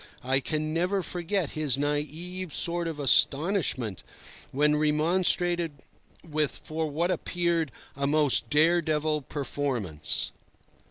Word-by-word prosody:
I 135 +2 +2
can 155 +2 -2
never 180 +3 0
forget 175 -1 -2
his 150 -4 +1
naïve 155 +5 -3
sort 170 0 +3
of 160 -2 -5
astonishment 140 - +2 0.5
when 150 +2 +2
remonstrated 170 +2 +2 0.5
with 155 -2 -1
for 160 0 -3
what 170 +5 0
appeared 170 -5 -1 0.2
a 140 +1 -1
most 145 -5 +2
dare 165 +5 +4
devil 155 -1 0
performance. 130 - -3
155 Hz, 110 wpm, -27 LUFS, 145-170 Hz, 0.5 s, dare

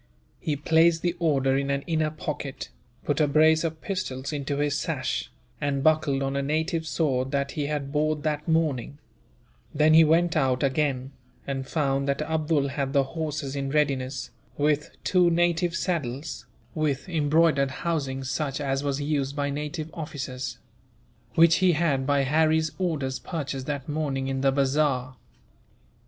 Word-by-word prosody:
He 150 - -1
placed 160 +3 +3
the 175 0 0
order 135 -5 +2
in 140 0 0
an 140 0 0
inner 155 -2 0
pocket, 150 -3 -5 0.4
put 145 +1 +1
a 150 - +4
brace 155 +2 +4
of 160 -1 -3
pistols 150 -9 -3
into 140 -1 -2
his 145 -1 +1
sash, - - -2 0.3
and 140 -1 0
buckled 155 -3 +2
on 135 0 -2
a 140 - +1
native 160 +3 -1
sword 135 -6 0
that 140 0 -1
he 145 -2 -2
had 145 -2 -3
bought 155 0 0
that 150 0 -2
morning; 150 -5 0 0.8
then 155 +1 +5
he 160 +1 +8
went 165 +2 +3
out 130 -4 +2
again, 135 -1 0 0.3
and 135 -1 -3
found 140 -3 0
that 140 +2 0
Abdool 155 -2 0
had 140 -1 -2
the 140 -1 +4
horses 150 -1 -4
in 135 -1 -2
readiness, 135 -3 -1 0.3
with 150 0 +1
two 180 -2 +4
native 170 0 +1
saddles, 155 -6 -3 0.3
with 150 -2 -1
embroidered 155 -3 +3
housings 135 -3 -2
such 135 0 -2
as 135 -1 -1
was 140 -1 -1
used 145 -1 -1
by 145 -1 -1
native 150 +2 -4
officers; 135 -5 -5 0.8
which 165 0 +6
he 185 -2 +4
had, 145 -5 +1
by 140 -1 +3
Harry's 155 +2 +2
orders, 150 -8 -1
purchased 140 -6 -4
that 140 -3 -3
morning 145 -3 -2
in 135 0 -2
the 135 0 +3
bazaar. 135 -2 +1
145 Hz, 155 wpm, -26 LUFS, 135-160 Hz, 0.8 s, he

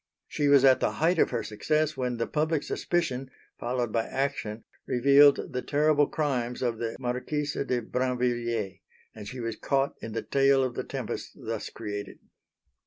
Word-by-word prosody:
She 145 - 0
was 140 -1 +6
at 130 -1 +6
the - - 0
height 165 +2 +2
of - - +4
her - - -2
success 155 +8 0
when 125 -2 -2
the 115 - 0
public 155 0 0
suspicion, 135 -7 -1 0.3
followed 120 -1 -1
by 115 0 0
action, 130 -5 -2 0.2
revealed 140 +3 +5
the 125 - -1
terrible 150 0 +3
crimes 125 -5 -2
of 115 -3 -1
the 115 -1 -3
Marquise 135 +4 -2
de 125 -3 -1
Brinvilliers; 120 -4 -1 0.3
and 105 -2 -9
she 125 +3 -7
was 115 -2 -3
caught 140 0 0
in 110 - -6
the 115 - -3
tail 135 -1 +3
of 130 -2 -1
the - - -3
tempest - - -5
thus 115 -1 -3
created. 105 -3 -6
125 Hz, 170 wpm, -28 LUFS, 115-145 Hz, 0.3 s, was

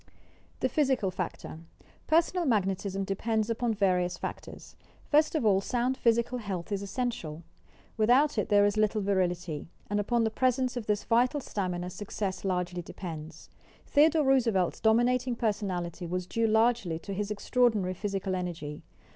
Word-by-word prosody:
THE - - +3
PHYSICAL 260 -7 +1
FACTOR 180 -3 -5 0.5
Personal 340 +3 +3
Magnetism 195 -3 0
depends 220 +3 -1
upon 230 -1 0
various 180 -3 +1
factors. - - -8 0.3
First 305 +2 +3
of 300 - 0
all 195 -2 +4
sound 245 +4 0
physical 235 +1 +1
health 195 -4 -5
is 200 -1 -1
essential. 200 -7 -4 0.5
With 215 0 +2
out 270 0 +4
it 210 - -2
there 205 -1 +5
is 205 +1 +1
little 215 0 +2
virility, 180 -5 -1 0.2
and 205 - +1
upon 235 +3 +1
the 220 - 0
presence 255 +1 +1
of 240 -3 -5
this 210 -1 0
vital 245 +5 +2
stamina 180 -7 -3
success 195 -1 -4
largely 180 -2 -1
depends. 165 -3 -8 0.3
Theodore 305 +1 +4
Roosevelt's 230 -9 +2
dominating 240 +3 +2
personality 190 -7 -2
was 180 +1 -2
due 230 +4 0
largely 220 -5 +2
to 195 +4 -7
his 205 +1 -3
extraordinary 210 -3 +1
physical 195 0 -3
energy. 170 -5 -4
205 Hz, 145 wpm, -29 LUFS, 185-240 Hz, 0.5 s, there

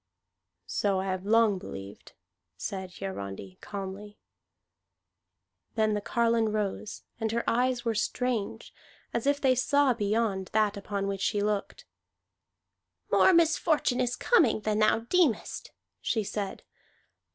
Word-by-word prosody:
"So 195 - 0
I 190 - -2
have 185 0 -3
long 220 -3 +4
believed," 100 - -9 0.4
said 190 - -5
Hiarandi 100 - -6
calmly. 200 +1 -7 1.6
Then 215 -1 +2
the 210 - -1
carline 230 +1 +2
rose, 210 0 -3 0.2
and 220 -1 -1
her 235 +1 -2
eyes 245 0 +1
were 230 - +1
strange, 225 0 -2 0.4
as 235 +3 -1
if 285 0 +3
they 265 -2 +4
saw 280 +1 +3
beyond 205 -3 0
that 215 -1 +2
upon 200 0 -3
which 195 -1 -3
she 205 +1 +1
looked. 205 -1 -2 1.3
"More - - +6
misfortune 315 -6 +3
is 245 -1 0
coming 315 - +3
than 215 0 0
thou 215 +1 +3
deemest," 275 - +1 0.3
she 220 - 0
said. 200 -1 -4
215 Hz, 125 wpm, -28 LUFS, 195-240 Hz, 1.6 s, More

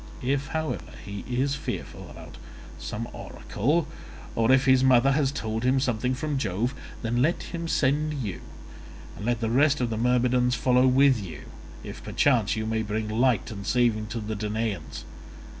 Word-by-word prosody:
If, 135 +2 0
however, 160 -1 -3
he 100 0 -6
is 130 +3 0
fearful - - -5
about - - -11 0.4
some 115 +2 -5
oracle, 150 +9 -1 0.5
or 115 +2 +2
if 130 0 +5
his 130 -1 +5
mother 130 +1 +5
has 140 -1 +2
told 110 -4 -3
him 130 +1 +3
something 125 -1 0
from 145 +1 -2
Jove, 110 +3 -1 0.3
then 120 +2 0
let 160 +6 +1
him 170 -1 -5
send 150 +1 +1
you, 110 -10 -4 0.7
and 105 - -6
let 120 -1 0
the 110 0 0
rest 145 +3 +3
of 120 -2 -1
the 110 - -2
Myrmidons 125 +1 +2
follow 125 +2 +3
with 130 -3 +4
you, 80 -6 -8 0.4
if - - -8
perchance 120 -8 +2
you 110 0 -2
may 110 0 0
bring 110 0 -3
light 115 -1 +1
and 100 -2 -6
saving 115 -2 +1
to 115 +2 -4
the 110 0 -4
Danaans. 105 -4 -3
125 Hz, 170 wpm, -26 LUFS, 110-135 Hz, 0.7 s, if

